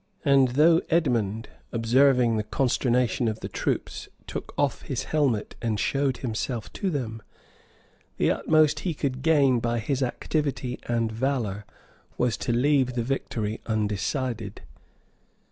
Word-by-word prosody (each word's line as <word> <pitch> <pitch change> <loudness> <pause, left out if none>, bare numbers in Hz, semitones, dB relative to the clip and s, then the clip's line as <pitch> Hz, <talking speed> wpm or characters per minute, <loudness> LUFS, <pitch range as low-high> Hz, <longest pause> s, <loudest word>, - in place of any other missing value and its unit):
And 135 -2 +5
though 165 +2 +6
Edmond, 115 - +1 0.2
observing 120 +1 +3
the 110 - +1
consternation 125 +1 +1
of 110 0 -3
the - - -4
troops, - - -3 0.2
took - - -6
off 145 -4 0
his 130 -5 -3
helmet, 135 -9 0
and 110 -3 -1
showed 135 +1 0
himself 115 -1 -4
to 195 - -2
them, 115 -8 -3 1.0
the - - +2
utmost 155 -2 +3
he 175 -4 -2
could 130 -3 -2
gain 140 -5 +4
by 120 0 -1
his 135 +4 -1
activity 130 0 -2
and 115 -2 0
valor 110 -4 -2 0.5
was 125 -3 +1
to - - -2
leave 130 0 +2
the 120 - 0
victory 115 -4 -3
undecided. 110 - -2
125 Hz, 130 wpm, -26 LUFS, 115-140 Hz, 1.0 s, though